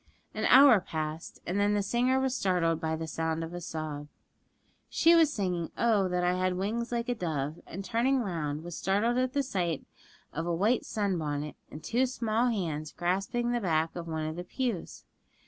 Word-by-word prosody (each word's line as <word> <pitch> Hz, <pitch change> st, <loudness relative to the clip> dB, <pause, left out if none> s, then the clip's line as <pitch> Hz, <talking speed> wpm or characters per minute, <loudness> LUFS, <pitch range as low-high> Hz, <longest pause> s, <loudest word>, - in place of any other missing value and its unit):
An -, -, -2 dB
hour 265 Hz, -5 st, +8 dB
passed, 155 Hz, -2 st, -5 dB
and 185 Hz, +3 st, -1 dB
then 205 Hz, +1 st, +3 dB
the 205 Hz, -, +1 dB
singer 245 Hz, +5 st, +2 dB
was 265 Hz, -1 st, 0 dB
startled 170 Hz, -6 st, +1 dB
by 160 Hz, -1 st, 0 dB
the 160 Hz, 0 st, -4 dB
sound 160 Hz, +1 st, -2 dB
of 165 Hz, +1 st, -6 dB
a 175 Hz, -, -5 dB
sob. 155 Hz, -3 st, -5 dB, 0.8 s
She 335 Hz, -, +5 dB
was 325 Hz, -3 st, +5 dB
singing 180 Hz, -, -2 dB
'Oh, 215 Hz, -5 st, +3 dB
that 180 Hz, 0 st, 0 dB
I 180 Hz, 0 st, +3 dB
had 185 Hz, 0 st, 0 dB
wings 225 Hz, +5 st, -2 dB
like 235 Hz, 0 st, -1 dB
a 245 Hz, -, +1 dB
dove!' 155 Hz, -, -3 dB
and 195 Hz, +3 st, -6 dB
turning 245 Hz, +4 st, +2 dB
round, 155 Hz, -7 st, -3 dB
was 175 Hz, -1 st, -6 dB
startled 220 Hz, +6 st, +1 dB
at 255 Hz, 0 st, 0 dB
the 285 Hz, -1 st, +1 dB
sight 175 Hz, -, -2 dB, 0.5 s
of 165 Hz, +2 st, -3 dB
a 170 Hz, -, +1 dB
white 215 Hz, +8 st, +2 dB
sun 200 Hz, -5 st, -1 dB
bonnet 150 Hz, -1 st, -3 dB
and 155 Hz, -, -10 dB
two 250 Hz, +3 st, +1 dB
small 235 Hz, -1 st, 0 dB
hands 160 Hz, -9 st, -2 dB
grasping 195 Hz, +7 st, -1 dB
the 240 Hz, -1 st, 0 dB
back 160 Hz, -4 st, 0 dB
of 170 Hz, -1 st, -5 dB
one 160 Hz, -1 st, -2 dB
of 155 Hz, +1 st, -4 dB
the 175 Hz, -, -4 dB
pews. 230 Hz, -1 st, -4 dB
185 Hz, 200 wpm, -29 LUFS, 160-235 Hz, 0.8 s, hour